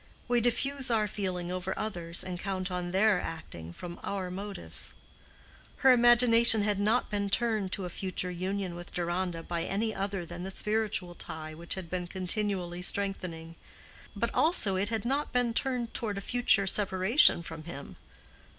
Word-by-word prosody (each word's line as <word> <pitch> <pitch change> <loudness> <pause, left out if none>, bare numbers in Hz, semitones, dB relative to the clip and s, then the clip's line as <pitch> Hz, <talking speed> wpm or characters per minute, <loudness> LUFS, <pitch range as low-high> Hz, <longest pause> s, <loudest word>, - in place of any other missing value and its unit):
We 240 -1 +2
diffuse 270 +3 +1
our 220 -3 +2
feeling 185 -3 -3
over 185 +1 -3
others, 175 -5 -2
and 180 -1 -5
count 190 -1 -3
on 180 -1 -3
their 195 0 +3
acting 85 - -7
from 175 - -8
our 190 -2 -4
motives. 200 +2 -5 0.9
Her 265 - +9
imagination 235 -2 +6
had 205 -1 0
not 210 +2 +1
been 200 -1 -1
turned 215 -3 0
to 195 - -2
a - - -4
future 185 0 -3
union 185 +1 -3
with 175 0 -10
Deronda 175 -1 -2
by 170 0 -3
any 215 +5 -1
other 195 -2 -3
than 175 +1 -8
the 190 - -4
spiritual 210 -3 -1
tie 160 -2 -6
which 170 +2 -3
had 190 -3 -6
been 180 +1 -4
continually 185 -1 -1
strengthening; 180 -4 -1 0.6
but - - -1
also 310 - +3
it 195 +2 0
had 225 -1 -2
not 275 +4 -1
been 245 -2 +1
turned 250 -2 -1
toward 210 -4 -2
a - - -3
future 215 -3 +2
separation 190 - +4
from 160 -2 -8
him. 140 -5 -8
195 Hz, 165 wpm, -30 LUFS, 175-215 Hz, 0.9 s, Her